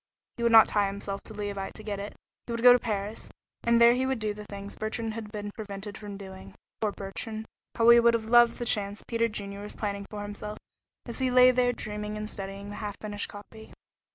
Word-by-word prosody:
He -, -, -6 dB
would 235 Hz, 0 st, +3 dB
not 225 Hz, -1 st, +9 dB
tie 205 Hz, -1 st, +2 dB
himself 200 Hz, 0 st, -5 dB
to 220 Hz, -, -9 dB
Leauvite 200 Hz, -2 st, -4 dB
to 215 Hz, -, -10 dB
get 205 Hz, -2 st, -4 dB
it. 205 Hz, +1 st, -6 dB, 0.3 s
He -, -, -5 dB
would 230 Hz, 0 st, -3 dB
go 245 Hz, 0 st, +10 dB
to 245 Hz, -, +4 dB
Paris, 210 Hz, -2 st, -4 dB, 0.3 s
and 235 Hz, 0 st, +4 dB
there 235 Hz, 0 st, +8 dB
he 260 Hz, +1 st, 0 dB
would 265 Hz, -1 st, 0 dB
do 215 Hz, -1 st, -2 dB
the 210 Hz, 0 st, -9 dB
things 200 Hz, 0 st, -8 dB
Bertrand 220 Hz, +1 st, -3 dB
had 215 Hz, -2 st, -7 dB
been 205 Hz, -1 st, -5 dB
prevented 205 Hz, -2 st, -7 dB
from 205 Hz, -1 st, -8 dB
doing. 190 Hz, -1 st, -10 dB, 0.3 s
Poor 215 Hz, -2 st, +1 dB
Bertrand! 215 Hz, +3 st, -6 dB, 0.3 s
How 230 Hz, -1 st, +3 dB
he 235 Hz, 0 st, +9 dB
would 235 Hz, 0 st, +5 dB
have 225 Hz, -1 st, -2 dB
loved 240 Hz, -1 st, +6 dB
the 240 Hz, -, -4 dB
chance 205 Hz, -2 st, +1 dB
Peter 230 Hz, -1 st, +1 dB
Junior 200 Hz, -2 st, -6 dB
was 210 Hz, -, -9 dB
planning 200 Hz, -2 st, -3 dB
for 205 Hz, -1 st, -6 dB
himself 210 Hz, +1 st, -6 dB, 0.5 s
as 235 Hz, +1 st, -7 dB
he 260 Hz, -1 st, +1 dB
lay 250 Hz, 0 st, +7 dB
there 250 Hz, 0 st, +2 dB
dreaming 210 Hz, -2 st, -5 dB
and 210 Hz, 0 st, -4 dB
studying 200 Hz, 0 st, -6 dB
the 205 Hz, -, -7 dB
half 205 Hz, -2 st, -5 dB
finished 210 Hz, -1 st, -4 dB
copy. 220 Hz, +2 st, -12 dB
210 Hz, 230 wpm, -28 LUFS, 205-230 Hz, 0.5 s, go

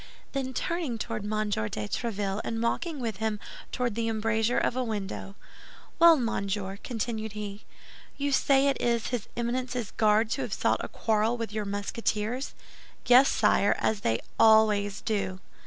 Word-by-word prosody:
Then 265 Hz, -1 st, -2 dB
turning 335 Hz, -9 st, -2 dB
toward 220 Hz, -1 st, -4 dB
M. 215 Hz, -1 st, -1 dB
de -, -, 0 dB
Tréville 195 Hz, -, -2 dB
and 225 Hz, 0 st, -2 dB
walking 300 Hz, +6 st, -1 dB
with 225 Hz, -5 st, -3 dB
him 220 Hz, -1 st, -1 dB, 0.3 s
toward 245 Hz, -3 st, -1 dB
the 225 Hz, +1 st, -1 dB
embrasure 225 Hz, +1 st, +1 dB
of -, -, +1 dB
a 255 Hz, -, 0 dB
window, 200 Hz, -3 st, -4 dB, 0.6 s
"Well, 335 Hz, -1 st, +8 dB
monsieur," 200 Hz, -5 st, -2 dB
continued 220 Hz, -2 st, -3 dB
he, 210 Hz, -1 st, -6 dB, 0.5 s
"you 285 Hz, 0 st, -1 dB
say 275 Hz, 0 st, +4 dB
it 275 Hz, -, 0 dB
is 235 Hz, -2 st, +1 dB
his 240 Hz, -4 st, -3 dB
Eminence's 245 Hz, -1 st, -2 dB
Guards 215 Hz, +1 st, +3 dB
who -, -, -3 dB
have -, -, -3 dB
sought -, -, +1 dB
a -, -, -3 dB
quarrel 220 Hz, +2 st, 0 dB
with 230 Hz, -3 st, -4 dB
your 215 Hz, -1 st, -2 dB
Musketeers?" 210 Hz, +4 st, -2 dB, 0.5 s
"Yes, 255 Hz, +3 st, +7 dB
sire, 210 Hz, -1 st, +3 dB
as 220 Hz, -, 0 dB
they 115 Hz, -, 0 dB, 0.2 s
always 210 Hz, -2 st, +4 dB
do." 195 Hz, -4 st, -2 dB
220 Hz, 155 wpm, -28 LUFS, 205-245 Hz, 0.6 s, Well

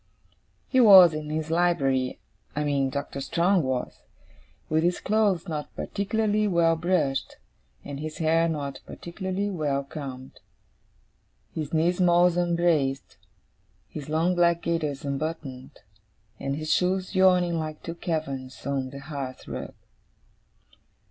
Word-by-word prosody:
He 260 Hz, -, +2 dB
was 190 Hz, -8 st, +9 dB
in 155 Hz, 0 st, -5 dB
his 155 Hz, +1 st, -3 dB
library 135 Hz, -7 st, +1 dB, 0.4 s
(I 150 Hz, -, 0 dB
mean 140 Hz, -2 st, +1 dB
Doctor 140 Hz, 0 st, -4 dB
Strong 175 Hz, +6 st, +2 dB
was), 130 Hz, -3 st, -3 dB, 0.7 s
with 155 Hz, +1 st, +1 dB
his 175 Hz, +2 st, +1 dB
clothes 205 Hz, -5 st, +1 dB
not 150 Hz, -3 st, -5 dB
particularly 210 Hz, +1 st, 0 dB
well 170 Hz, -3 st, +3 dB
brushed, 160 Hz, -5 st, 0 dB, 0.5 s
and 140 Hz, -1 st, -6 dB
his 155 Hz, +1 st, -6 dB
hair 165 Hz, +1 st, +2 dB
not 145 Hz, -3 st, -4 dB
particularly 190 Hz, +3 st, -4 dB
well 145 Hz, -6 st, -1 dB
combed; 135 Hz, -2 st, -8 dB, 1.1 s
his 155 Hz, -3 st, -4 dB
knee 165 Hz, +2 st, +3 dB
smalls 175 Hz, -1 st, +3 dB
unbraced; 170 Hz, -6 st, 0 dB, 0.7 s
his 150 Hz, -2 st, -8 dB
long 165 Hz, +4 st, +2 dB
black 170 Hz, -1 st, +2 dB
gaiters 155 Hz, -5 st, -2 dB
unbuttoned; 140 Hz, -2 st, -5 dB, 0.6 s
and 140 Hz, 0 st, -2 dB
his 155 Hz, +1 st, -1 dB
shoes 185 Hz, +1 st, 0 dB
yawning 180 Hz, -3 st, +3 dB
like 155 Hz, -1 st, -5 dB
two 165 Hz, -, -5 dB
caverns 140 Hz, -6 st, -4 dB
on 135 Hz, -2 st, -2 dB
the 140 Hz, +1 st, -9 dB
hearth 140 Hz, -3 st, -6 dB
rug. -, -, -6 dB
160 Hz, 125 wpm, -26 LUFS, 140-175 Hz, 1.1 s, was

